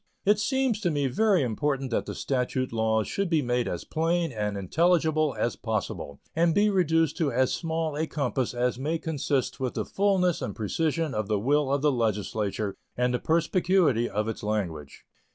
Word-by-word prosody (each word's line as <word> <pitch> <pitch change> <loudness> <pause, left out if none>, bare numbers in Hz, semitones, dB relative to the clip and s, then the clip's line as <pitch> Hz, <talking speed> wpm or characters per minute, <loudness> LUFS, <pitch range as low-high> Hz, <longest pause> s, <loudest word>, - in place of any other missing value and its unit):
It 205 +1 +4
seems 260 -2 0
to 180 - +1
me 145 -3 0
very 190 - +2
important 135 +2 -1
that - - -1
the - - -5
statute 130 -1 -1
laws 110 -1 +1
should 200 -2 -1
be 160 -3 +2
made 120 0 0
as - - -3
plain 165 +1 0
and 105 -3 -2
intelligible 155 - +2
as 120 - 0
possible, 100 - -4 0.2
and 165 0 +3
be 210 +1 +4
reduced 165 -5 +2
to 155 -4 +1
as 130 +1 +2
small 160 -2 -2
a 155 +2 -1
compass 130 -4 -2
as 125 0 0
may 155 +5 -1
consist 145 -5 -2
with 130 -2 -2
the - - -2
fullness 190 -3 +1
and 105 - -4
precision 155 +7 -1
of 110 -1 -2
the 105 -1 +1
will 140 +6 +1
of 140 0 0
the 150 - +4
Legislature 105 -3 -1 0.2
and 125 0 +1
the 125 - 0
perspicuity 165 -6 +2
of 105 +1 -1
its 110 - -4
language. 90 -9 -4
140 Hz, 185 wpm, -27 LUFS, 115-165 Hz, 0.2 s, It